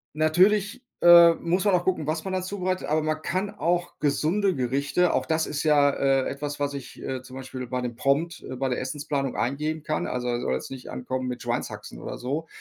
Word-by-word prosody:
Natürlich, 190 +8 +3 0.2
äh, 170 -1 +9
muss 175 +3 0
man 200 -3 +4
auch 175 - +1
gucken, 180 -5 0
was 155 0 -1
man 190 - -3
da 185 - 0
zubereitet, 185 0 -2
aber 155 +1 +2
man 155 0 -1
kann 190 +5 -2
auch 175 -3 -1
gesunde 170 +7 +1
Gerichte 140 +7 +1
auch - - 0
das 160 0 +1
ist 150 0 -3
ja, 145 -2 +5
äh, 135 -1 +1
etwas, 145 +1 -4
was 145 0 -1
ich, 140 -3 -8
äh, 130 -1 -4
zum 130 0 -12
Beispiel 130 -1 -6
bei 125 +1 -2
dem 120 -1 -4
Prompt, 145 +7 0
äh, - - -5
bei 135 +1 -1
der 125 - -1
Essensplanung 145 -3 -3
eingeben 150 +9 -2
kann. 155 0 -2
Also, 125 -1 -3
der 120 0 -1
soll 65 - -1
jetzt 65 - -4
nicht 130 -1 -8
ankommen 130 0 -3
mit 125 -1 -4
Schweinshaxen - - -4
oder - - -6
so, 145 +6 -3
150 Hz, 220 wpm, -26 LUFS, 130-175 Hz, 0.2 s, äh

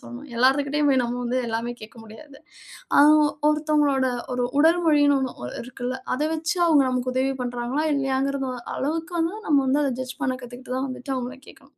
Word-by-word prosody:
சொல்லணும். 255 +4 -10
எல்லார்துகிட்டயும் 280 +4 +2
போய் 260 -2 +3
நம்ம 240 +1 -3
வந்து 245 +1 -1
எல்லாமே 230 +2 -2
கேக்க 215 +2 -12
முடியாது. 275 +6 -13 0.6
அ - - +9 0.5
ஒருத்தவங்களோட 300 -3 +2 0.3
ஒரு 250 - -1 0.2
உடல்மொழினு 310 -3 +4
ஒண்ணு 185 - -5
இருக்குல்ல. 250 +1 -5 0.2
அத 270 - -2
வச்சு 325 +3 -2
அவங்க 300 -4 +5
நமக்கு 255 0 -1
உதவி 265 +1 +1
பண்றாங்களா 245 +5 -2
இல்லையாங்கற 270 0 0 0.4
அளவுக்கு 325 +5 -3
வந்து 335 +5 -1
நம்ம 295 -2 +4
வந்து 270 +3 +2
அத 270 - 0
ஜட்ஜ் 255 +3 -6
பண்ண 260 -3 +1
கத்துக்கிட்டு 250 +1 -8
தான் 270 +1 -2
வந்துட்டு 260 +1 -6
அவங்கள 255 +2 -5
கேக்கணும். 275 +1 -17
270 Hz, 170 wpm, -24 LUFS, 250-295 Hz, 0.6 s, அ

